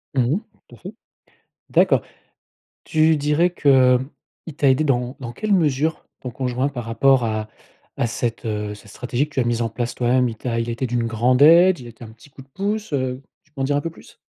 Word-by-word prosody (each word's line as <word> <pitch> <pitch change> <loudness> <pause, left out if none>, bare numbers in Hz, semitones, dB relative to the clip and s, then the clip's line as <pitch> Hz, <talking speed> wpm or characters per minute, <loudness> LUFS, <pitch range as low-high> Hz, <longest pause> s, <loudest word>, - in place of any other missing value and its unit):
Mmh 130 - +3
mh. - - -1 0.3
Tout 120 - -15
à - - -19
fait. 190 +4 -9 0.8
D'accord. - - +3 0.8
Tu 160 0 +3
dirais 150 +4 +1
qu'il 130 -5 +4 0.6
t'a 140 - +2
aidée 135 +4 +2
dans 125 -2 -1
dans 120 -2 -6
quelle 215 - -2
mesure 155 -3 +1
ton 125 - -6
conjoint 125 +1 -2
par 125 -4 -6
rapport 130 +2 +3
à 110 -1 -2 0.5
à - - +1
cette, 115 0 -3
heu, 105 -2 -3
cette 105 0 -15
stratégie 125 +5 -2
que 150 - -20
tu - - +1
as - - +1
mise 120 0 0
en 115 - -2
place 120 +2 -4
toi-même? 125 +1 +2
Il 115 - -7
t'a 115 0 -3
il 115 - -3
a - - -1
été 120 +3 -3
d'une 120 -1 -1
grande 120 +3 +2
aide? 175 +4 +7
Il 120 - -10
a - - -9
été 115 +1 -13
un - - -11
petit 115 +6 -19
coup 135 - -13
de 135 - -23
pouce? 205 +6 -3
Heu, 130 -1 -2 0.2
tu 155 - -34
peux 145 - -10
m'en - - +1
dire 145 +1 0
un - - +1
peu 165 - -4
plus? 165 - -17
130 Hz, 235 wpm, -21 LUFS, 120-150 Hz, 0.8 s, aide